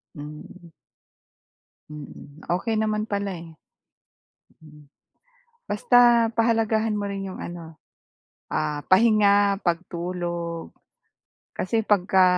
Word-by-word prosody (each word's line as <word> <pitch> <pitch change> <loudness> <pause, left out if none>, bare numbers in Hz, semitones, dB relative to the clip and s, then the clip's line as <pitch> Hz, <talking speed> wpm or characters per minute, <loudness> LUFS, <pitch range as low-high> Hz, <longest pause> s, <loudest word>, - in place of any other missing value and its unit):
Hmm. 150 +4 -11 1.2
Mm. 150 0 -11
Okey 220 +6 0
naman 215 0 -1
pala, 200 -1 -2
eh. 170 -1 -9 1.1
Mm. 150 -2 -17 0.8
Basta 240 +2 +5
pahalagahan 225 -1 +2
mo 205 - -2
rin 195 -1 -4
yung - - -9
ano, 165 -2 -8 0.7
ah, 150 -1 -2
pahinga, 205 -1 +4
pagtulog, 170 -1 -3 0.8
kasi 225 +4 -1
pagka 190 -2 +3
190 Hz, 85 wpm, -24 LUFS, 170-215 Hz, 1.2 s, Basta